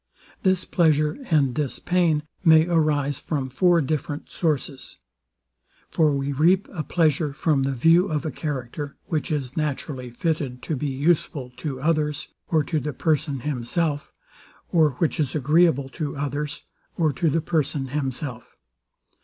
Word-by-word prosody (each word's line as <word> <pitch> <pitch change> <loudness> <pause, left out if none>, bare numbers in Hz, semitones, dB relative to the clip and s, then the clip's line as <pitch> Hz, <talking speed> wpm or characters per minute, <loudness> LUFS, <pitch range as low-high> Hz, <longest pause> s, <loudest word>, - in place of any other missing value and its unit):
This 185 -2 +2
pleasure 155 - +2
and 145 -6 +3
this 145 -2 -2
pain 170 -4 +1 0.2
may 160 -2 +7
arise 150 -5 +1
from 140 -4 -3
four 175 +5 +3
different 145 0 -3
sources. 145 -5 -2 0.9
For 160 -2 +3
we 140 0 -1
reap 170 +8 +3
a 170 - -3
pleasure 155 -2 +1
from 150 -1 +1
the 135 +1 0
view 165 +9 +4
of 155 -3 -2
a 155 - -1
character, 140 0 -5
which 160 0 -2
is 135 -4 -2
naturally 140 -4 -3
fitted 130 -1 -2
to 155 - -2
be 145 +2 -2
useful 140 -2 0
to 140 -5 -4
others, 150 -1 0 0.2
or 160 -2 +3
to 155 +2 -1
the 150 +1 -4
person 145 -1 0
himself, 145 +3 -1 0.6
or 155 -5 +4
which 160 +5 -1
is 145 -3 0
agreeable 150 -1 +3
to 145 0 -4
others, 145 +1 -3 0.3
or 155 -4 +2
to 165 - +1
the 165 - +1
person 145 -4 -1
himself. 130 -3 -4
150 Hz, 145 wpm, -24 LUFS, 140-160 Hz, 0.9 s, may